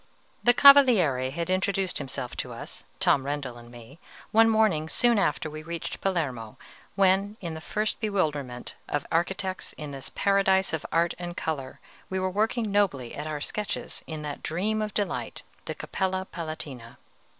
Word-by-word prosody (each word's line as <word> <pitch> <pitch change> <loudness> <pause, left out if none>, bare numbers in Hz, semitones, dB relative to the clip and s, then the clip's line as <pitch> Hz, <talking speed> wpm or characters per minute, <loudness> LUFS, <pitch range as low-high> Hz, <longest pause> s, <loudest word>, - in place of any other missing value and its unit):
The 245 0 +5
Cavaliere 225 - +7
had 170 +6 -3
introduced 190 0 +1
himself 135 -3 -5
to - - -3
us, - - -9
Tom 135 - +3
Rendel 135 -4 -4
and 120 0 -13
me, 120 +5 -13 0.3
one 225 +1 +6
morning 210 -9 +2
soon 235 +4 +3
after 155 -4 +1
we 155 0 -7
reached 165 +1 -5
Palermo, 135 - -2 0.4
when, 195 +2 +3
in 170 -3 -5
the 160 - -7
first 215 +5 -2
bewilderment 150 - -2 0.2
of 145 -1 -1
architects 185 +2 -1
in 150 -1 -7
this 135 -1 -7
paradise 195 -2 +3
of 160 - -2
art 170 +1 +2
and 175 0 -5
color, 140 -5 -3 0.3
we 190 - -1
were 185 0 0
working 220 +2 0
nobly 170 -12 +1
at 150 +1 -5
our 150 -1 -4
sketches 210 +6 -4
in 155 -1 -5
that 145 -1 -5
dream 210 +6 -1
of 215 -1 -3
delight, 205 -2 -2 0.2
the - - -4
Capella 190 0 -2
Palatina. 150 -8 -6
170 Hz, 160 wpm, -27 LUFS, 145-200 Hz, 0.4 s, Cavaliere